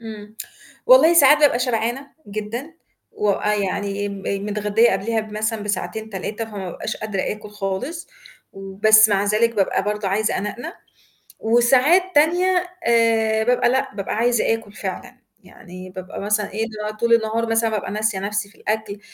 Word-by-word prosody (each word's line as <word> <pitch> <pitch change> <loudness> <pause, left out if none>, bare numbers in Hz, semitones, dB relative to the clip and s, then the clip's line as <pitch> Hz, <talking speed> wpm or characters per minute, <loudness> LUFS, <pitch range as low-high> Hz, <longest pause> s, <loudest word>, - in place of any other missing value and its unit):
إمم. 215 -1 -10 0.5
والله - - +7
ساعات 295 -1 +7
بابقى 290 -5 +4
شبعانة 245 +2 -1 0.2
جدًا 215 +9 -6 0.4
و 210 - 0
آآ 210 +1 0
يعني 200 0 -2
م 200 -1 -8 0.2
متغدية 210 +2 +2
قبليها 220 +4 -1
ب 215 0 -10
مثلًا 215 0 -2
بساعتين، 220 +1 -4
3 205 +3 -4
فما 205 -4 -7
أبقاش - - -5
قادرة 210 -3 -3
آكُل 210 0 -5
خالص 210 - -5 0.4
و 195 0 -9
بس 215 +2 +6
مع 200 -1 +1
ذلك 220 +3 +1
بابقى 195 -2 +1
برضه 210 0 -2
عايزة 210 +2 0
أنَقنَق. 240 - -5 0.7
وساعات 250 +9 +4
تانية 360 +4 +3 0.2
آآ 225 -2 +3
بابقى 245 +1 +2
لأ، 265 -3 -1
بابقى 195 - -4
عايزة 235 0 +2
آكُل 225 -2 -7
فعلًا. - - -7 0.3
يعني 185 0 -12
بابقى 185 +1 -8
مثلًا 210 0 -1
إيه، 220 +2 -1
اللي 220 - -10
هو 215 - -7
طول 235 +1 +2
النهار 225 0 +1
مثلًا 225 0 +2
بابقى 215 -2 -3
ناسية 210 -1 -1
نَفسي 205 +1 -3
في 215 - -23
الأكل 215 -1 -3
215 Hz, 165 wpm, -21 LUFS, 205-235 Hz, 0.7 s, والله